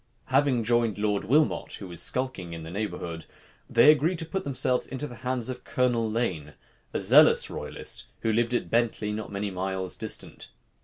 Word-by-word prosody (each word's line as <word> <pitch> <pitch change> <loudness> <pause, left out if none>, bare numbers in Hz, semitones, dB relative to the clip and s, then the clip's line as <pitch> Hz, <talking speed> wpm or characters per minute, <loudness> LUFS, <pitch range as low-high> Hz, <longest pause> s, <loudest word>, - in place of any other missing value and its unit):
Having 135 -4 +3
joined 115 -2 +1
Lord 105 -1 0
Wilmot, 150 +7 +2
who 95 - -7
was 85 -2 -6
skulking 125 -10 -2
in 80 -1 -7
the 80 - -8
neighborhood, 85 -5 -4 0.4
they 145 +6 +7
agreed 160 +4 +1
to 165 - -3
put 190 +4 -3
themselves 130 -2 0
into 135 +3 -4
the 120 -5 -9
hands 125 -2 -3
of 130 - -6
Colonel 120 -3 +1
Lane, 90 -10 -2 0.4
a - - -2
zealous - - +6
royalist, - - -5 0.2
who 115 - +1
lived 120 +2 +1
at - - -2
Bentley, 115 -2 +1
not 105 0 -5
many 100 0 -3
miles 95 0 -3
distant. - - -4
115 Hz, 175 wpm, -27 LUFS, 100-130 Hz, 0.4 s, they